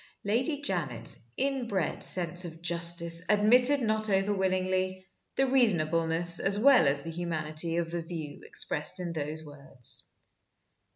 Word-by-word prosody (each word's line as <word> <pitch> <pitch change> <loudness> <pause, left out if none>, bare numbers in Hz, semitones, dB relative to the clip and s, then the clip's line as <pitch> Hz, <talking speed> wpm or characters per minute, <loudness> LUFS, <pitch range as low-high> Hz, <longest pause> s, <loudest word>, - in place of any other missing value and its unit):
Lady 255 +8 -1
Janet's 135 - -4
inbred 245 - -2
sense 175 0 +5
of 165 -2 -8
justice 170 0 +1
admitted 245 +7 +4
not 215 -1 -1
over 195 +1 +1
willingly 185 -1 -2 0.3
the 270 - +2
reasonableness 170 -8 +2
as 195 +1 +1
well 255 - +5
as 140 0 0
the 165 - -6
humanity 165 -1 -2
of 170 -1 -2
the 170 0 -3
view 160 -3 -8
expressed 150 +4 -2
in 175 -2 -5
those 155 0 -5
words. 140 -4 -4
175 Hz, 130 wpm, -28 LUFS, 160-205 Hz, 0.3 s, sense